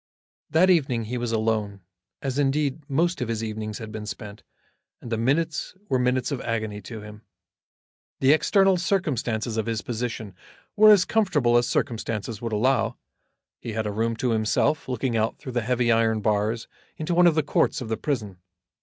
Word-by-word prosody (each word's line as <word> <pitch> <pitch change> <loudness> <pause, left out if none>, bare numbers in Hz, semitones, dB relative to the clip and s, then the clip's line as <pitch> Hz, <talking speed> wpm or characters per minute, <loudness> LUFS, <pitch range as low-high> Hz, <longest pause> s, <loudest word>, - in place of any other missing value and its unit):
That 175 +5 +4
evening 135 -9 +2
he 120 +3 -4
was 120 -1 -2
alone, 110 -3 -1 0.4
as, 135 0 -2
indeed, 145 +1 0
most 165 +3 +1
of 125 - -1
his 115 -1 -2
evenings 110 -1 -4
had 110 -3 -8
been 105 -1 -6
spent, 105 0 -7 0.6
and 120 - -10
the 115 - 0
minutes 155 +9 0
were 130 - +2
minutes 125 +2 +1
of 135 - -2
agony 110 -3 -3
to 110 +2 -8
him. 105 0 -11 1.0
The 135 +1 +5
external 195 +4 +3
circumstances 125 - -1
of 110 - -1
his 115 -2 -2
position 115 -3 -4 0.4
were 215 0 +7
as 205 -4 +7
comfortable 150 - +2
as 120 0 +4
circumstances 110 -2 -2
would 115 -1 -3
allow. 120 +4 +1 0.6
He 115 - -6
had 110 0 -2
a 105 - -1
room 115 +2 -1
to 120 +2 -1
himself 110 +7 +1
looking 125 -1 -1
out 110 0 0
through 130 -4 -8
heavy 120 0 +1
iron 115 -1 +2
bars 110 +2 0 0.3
into 155 +3 -2
one 175 +1 +6
of 165 - +4
the 155 - +2
courts 145 - +1
of 125 - -6
the 110 - -1
prison. 105 -11 -3
120 Hz, 180 wpm, -25 LUFS, 110-140 Hz, 1.0 s, were